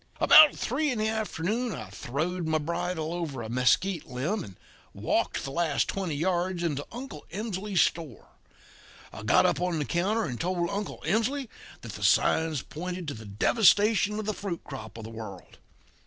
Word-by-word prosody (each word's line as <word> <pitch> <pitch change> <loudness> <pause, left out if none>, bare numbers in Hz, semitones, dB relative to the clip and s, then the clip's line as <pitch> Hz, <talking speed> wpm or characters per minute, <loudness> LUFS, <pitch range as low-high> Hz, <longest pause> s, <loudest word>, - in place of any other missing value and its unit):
"About 310 -2 +8
three 295 +5 -1
in 250 - -1
the 215 0 +1
afternoon 220 +2 -2
I 105 -3 -8
throwed 160 - -3
my 160 0 +2
bridle 170 +1 -2
rein 175 - -3
over 140 -8 -4
a 110 - -6
mesquite 145 +9 +1
limb 145 - -2
and 95 - -11 0.4
walked - - -1
the 135 - -5
last 160 -1 +1
twenty 185 -6 -2
yards 175 +2 0
into 145 -4 -2
Uncle 240 - -8
Emsley's 205 -1 -1
store. 155 - -2 0.8
I - - -8
got - - +4
up - - +1
on 180 -2 0
the 150 - -1
counter 200 +8 0
and 125 -4 -4
told 175 0 -1
Uncle 205 +1 -4
Emsley 230 +8 0 0.3
that - - -8
the - - -7
signs 160 -4 +3
pointed 180 +1 -6
to - - -4
the 110 0 -10
devastation 210 - +3
of 215 - -3
the 215 - -1
fruit 195 -4 -5
crop 115 -6 -9
of 115 - -8
the 110 - -8
world. 110 -3 -9
175 Hz, 180 wpm, -28 LUFS, 145-210 Hz, 0.8 s, About